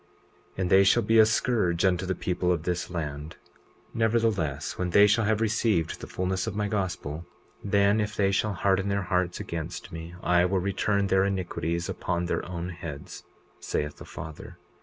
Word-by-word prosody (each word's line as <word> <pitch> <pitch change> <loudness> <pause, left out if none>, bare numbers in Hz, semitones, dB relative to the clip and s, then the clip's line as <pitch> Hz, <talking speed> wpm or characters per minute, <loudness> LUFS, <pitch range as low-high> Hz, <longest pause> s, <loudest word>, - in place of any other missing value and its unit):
20:28 - - -29
And 90 - 0
they 95 +1 +7
shall 115 +4 +4
be 110 +2 +4
a 110 - +8
scourge 105 -7 +1
unto 90 0 +1
the 95 - 0
people 90 0 -1
of 85 -3 0
this 90 0 -2
land. 75 -3 -5 0.6
Nevertheless, 110 - 0
when 90 -1 -2
they 100 +4 +7
shall 105 +2 +3
have 110 0 +1
received 110 -6 +1
the - - -7
fulness 95 +2 -2
of 105 - -3
my 105 0 0
gospel, 85 -6 -3 0.4
then 100 +1 +3
if 105 0 -3
they 100 -1 +2
shall 105 +1 +1
harden 95 +1 +1
their 100 0 0
hearts 90 -1 0
against 85 -3 -5
me 80 +1 -8
I 90 0 +4
will 95 +2 +1
return 100 +2 0
their 95 0 +3
iniquities 85 -3 -2
upon 85 -1 -2
their 85 - -1
own 85 0 -4
heads, 85 -5 -8 0.4
saith 75 0 -3
the - - -10
Father. 80 -1 -9
95 Hz, 180 wpm, -27 LUFS, 85-100 Hz, 0.6 s, a